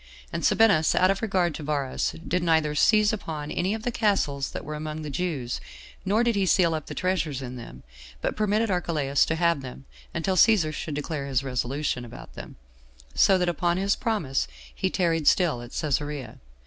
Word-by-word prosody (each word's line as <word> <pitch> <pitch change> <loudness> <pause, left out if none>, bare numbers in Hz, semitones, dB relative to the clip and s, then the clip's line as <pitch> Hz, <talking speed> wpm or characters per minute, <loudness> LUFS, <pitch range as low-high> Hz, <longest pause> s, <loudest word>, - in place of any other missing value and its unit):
And 170 - -3
Sabinus, 200 -8 +4
out 185 +1 +4
of 195 - -2
regard 185 -6 +1
to - - -7
Varus, 145 -3 -2
did 180 +1 0
neither 160 -3 +2
seize 215 +7 +4
upon 155 -7 -5
any 190 +4 0
of 220 - -7
the 245 - -1
castles 170 - 0
that - - -7
were 155 - -5
among 155 +1 -5
the 150 - -5
Jews, 140 -6 -3 0.4
nor 210 +4 +2
did 235 -1 +2
he 195 -2 +1
seal 170 -2 +4
up 155 -2 -4
the - - -7
treasures 155 -7 -1
in 125 0 -6
them, 115 - -10 0.4
but - - -2
permitted 215 +1 +1
Archelaus 150 -6 +1
to 160 - 0
have 170 -3 +2
them, 135 +1 -9 0.3
until 180 +3 -1
Cæsar 185 -7 +4
should 150 0 -4
declare 145 -1 -3
his 135 -1 0
resolution 130 +1 -2
about 120 - -11
them; - - -10 0.6
so 195 - +5
that, 180 -1 0
upon 175 +1 0
this 190 - -1
his 200 +1 +2
promise, 185 - -1 0.3
he - - -1
tarried 165 -4 0
still 165 -10 +3
at 120 - -9
Cæsarea. 145 0 -3
160 Hz, 195 wpm, -26 LUFS, 140-190 Hz, 0.6 s, so